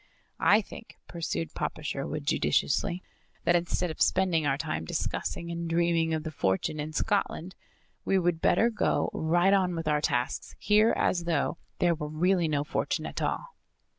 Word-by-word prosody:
"I 210 Hz, +2 st, +6 dB
think," 225 Hz, -, -12 dB
pursued 165 Hz, -1 st, -4 dB
Papa 155 Hz, -, -4 dB
Sherwood 140 Hz, +1 st, -3 dB
judiciously, 170 Hz, +4 st, +1 dB, 0.4 s
"that 175 Hz, -, +3 dB
instead 175 Hz, 0 st, 0 dB
of -, -, -10 dB
spending 175 Hz, -5 st, +2 dB
our 135 Hz, -1 st, +1 dB
time 80 Hz, -, -3 dB
discussing 170 Hz, -, -3 dB
and 170 Hz, 0 st, -4 dB
dreaming 165 Hz, -1 st, +2 dB
of 160 Hz, -1 st, -1 dB
the 160 Hz, -, -5 dB
fortune 95 Hz, +3 st, -1 dB
in 150 Hz, +1 st, -4 dB
Scotland, 185 Hz, -1 st, -1 dB, 0.5 s
we 195 Hz, -, +2 dB
would 175 Hz, -2 st, +1 dB
better 230 Hz, +7 st, +3 dB
go 215 Hz, -, 0 dB
right 175 Hz, +4 st, +2 dB
on 185 Hz, -3 st, +2 dB
with 165 Hz, -1 st, -4 dB
our 150 Hz, -1 st, +2 dB
tasks 125 Hz, -5 st, -1 dB
here 215 Hz, +2 st, +4 dB
as 175 Hz, -2 st, +1 dB
though 170 Hz, 0 st, 0 dB, 0.2 s
there 175 Hz, -1 st, +3 dB
were 150 Hz, -2 st, -4 dB
really 175 Hz, +2 st, +2 dB
no 145 Hz, -2 st, 0 dB
fortune 150 Hz, -, -2 dB
at -, -, -5 dB
all." -, -, -2 dB
170 Hz, 165 wpm, -28 LUFS, 155-180 Hz, 0.5 s, I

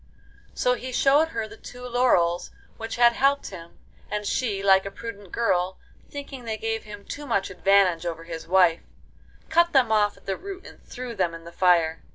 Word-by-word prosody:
So 250 Hz, -, +2 dB
he 255 Hz, +1 st, -5 dB
showed 280 Hz, +5 st, +4 dB
her 225 Hz, -9 st, -4 dB
the -, -, -13 dB
two 250 Hz, 0 st, -10 dB
laurels 235 Hz, -9 st, +2 dB, 0.3 s
which 225 Hz, 0 st, -5 dB
had 235 Hz, 0 st, +5 dB
helped 275 Hz, 0 st, +1 dB
him, 170 Hz, -3 st, -11 dB, 0.3 s
and 210 Hz, 0 st, -3 dB
she, 205 Hz, -4 st, -1 dB
like 190 Hz, -1 st, +5 dB
a 195 Hz, -, -5 dB
prudent 205 Hz, -2 st, -9 dB
girl, 185 Hz, -5 st, 0 dB, 0.3 s
thinking 280 Hz, -3 st, -8 dB
they 220 Hz, -2 st, -3 dB
gave 225 Hz, 0 st, -3 dB
him 205 Hz, -1 st, -10 dB
too 290 Hz, 0 st, -7 dB
much 200 Hz, -6 st, 0 dB
advantage 185 Hz, -2 st, +3 dB
over 165 Hz, -1 st, -4 dB
his 165 Hz, -1 st, -8 dB
wife, 180 Hz, -2 st, +4 dB, 0.7 s
cut 340 Hz, +1 st, +3 dB
them 255 Hz, -5 st, +4 dB
off 210 Hz, -1 st, +2 dB
at -, -, -22 dB
the 195 Hz, -, -2 dB
root 390 Hz, 0 st, -8 dB
and -, -, -14 dB
threw 250 Hz, -1 st, -7 dB
them 180 Hz, -5 st, -1 dB
in 165 Hz, -, -11 dB
the 170 Hz, -, -10 dB
fire. 170 Hz, -3 st, +2 dB
210 Hz, 195 wpm, -25 LUFS, 180-250 Hz, 0.7 s, had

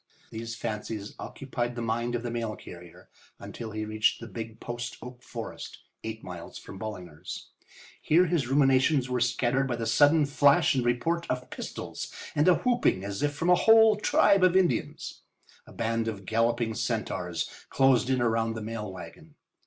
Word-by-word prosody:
These 115 Hz, +1 st, -5 dB
fancies 110 Hz, -2 st, -5 dB
occupied 120 Hz, -3 st, -4 dB
the 120 Hz, -, -4 dB
mind 120 Hz, +2 st, -1 dB
of 120 Hz, -, -3 dB
the 120 Hz, -, -3 dB
mail 115 Hz, -2 st, -3 dB
carrier 85 Hz, -1 st, -12 dB, 0.3 s
until 115 Hz, -2 st, -7 dB
he 110 Hz, 0 st, -4 dB
reached 110 Hz, 0 st, +1 dB
the 115 Hz, -, -8 dB
big 110 Hz, +1 st, -7 dB
post 120 Hz, 0 st, -5 dB
oak 125 Hz, +1 st, -10 dB
forest, -, -, -7 dB, 0.3 s
eight 110 Hz, 0 st, -6 dB
miles 90 Hz, -2 st, -8 dB
from 95 Hz, -, -10 dB
Ballinger's. 90 Hz, -8 st, -7 dB, 0.5 s
Here 170 Hz, +4 st, +4 dB
his 165 Hz, -6 st, 0 dB
ruminations 135 Hz, 0 st, +3 dB
were 125 Hz, -, +1 dB
scattered 125 Hz, +2 st, +1 dB
by 120 Hz, -, -1 dB
the 115 Hz, -1 st, -3 dB
sudden 145 Hz, +7 st, +5 dB
flash 145 Hz, +3 st, +4 dB
and 130 Hz, -2 st, +1 dB
report 165 Hz, +8 st, 0 dB
of 125 Hz, 0 st, -3 dB
pistols -, -, -6 dB, 0.2 s
and 150 Hz, +3 st, +2 dB
a 180 Hz, -, +7 dB
whooping 240 Hz, -, +1 dB
as 100 Hz, +4 st, -4 dB
if 145 Hz, 0 st, 0 dB
from 165 Hz, +5 st, +1 dB
a -, -, +9 dB
whole 220 Hz, +1 st, +6 dB
tribe 200 Hz, -2 st, +4 dB
of 185 Hz, 0 st, +5 dB
Indians. 185 Hz, -2 st, -1 dB, 0.5 s
A -, -, -13 dB
band 115 Hz, 0 st, -1 dB
of 100 Hz, -3 st, -5 dB
galloping 115 Hz, +1 st, +1 dB
centaurs 110 Hz, -7 st, -2 dB, 0.2 s
closed 130 Hz, -2 st, +3 dB
in 130 Hz, -2 st, +2 dB
around 115 Hz, -1 st, +1 dB
the 110 Hz, -, -5 dB
mail 105 Hz, -2 st, -5 dB
wagon. 150 Hz, -, -11 dB
120 Hz, 170 wpm, -28 LUFS, 110-140 Hz, 0.5 s, a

